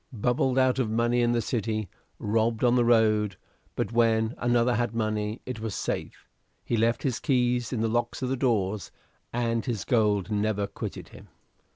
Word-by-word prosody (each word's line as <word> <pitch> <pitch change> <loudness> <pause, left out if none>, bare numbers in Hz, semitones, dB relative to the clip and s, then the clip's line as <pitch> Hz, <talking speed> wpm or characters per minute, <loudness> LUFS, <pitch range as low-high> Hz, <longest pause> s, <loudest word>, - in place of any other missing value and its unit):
Bubbled 125 +2 0
out 130 0 +3
of 120 -4 0
money 120 +2 +1
in 120 0 +2
the 120 -1 +1
City; 110 -3 -2 0.3
robbed 110 +2 0
on 120 -1 +4
the 120 - +4
road; 110 -4 +3 0.4
but - - -2
when 115 -1 +2
another 120 0 +2
had 120 -2 -1
money, 110 0 -2
it 125 -3 -5
was 110 -3 -4
safe; - - -4 0.4
he 120 - 0
left 115 +1 +1
his 130 -5 -1
keys 125 -4 +1
in 120 - -1
the 115 - +2
locks 120 +3 -1
of 125 - -1
both 135 - -1
doors, 105 -7 0 0.4
and 115 -1 0
his 115 -5 -2
gold 105 -4 +1
never 105 -1 0
quitted 100 - -7
him. - - -14
115 Hz, 180 wpm, -27 LUFS, 110-120 Hz, 0.4 s, on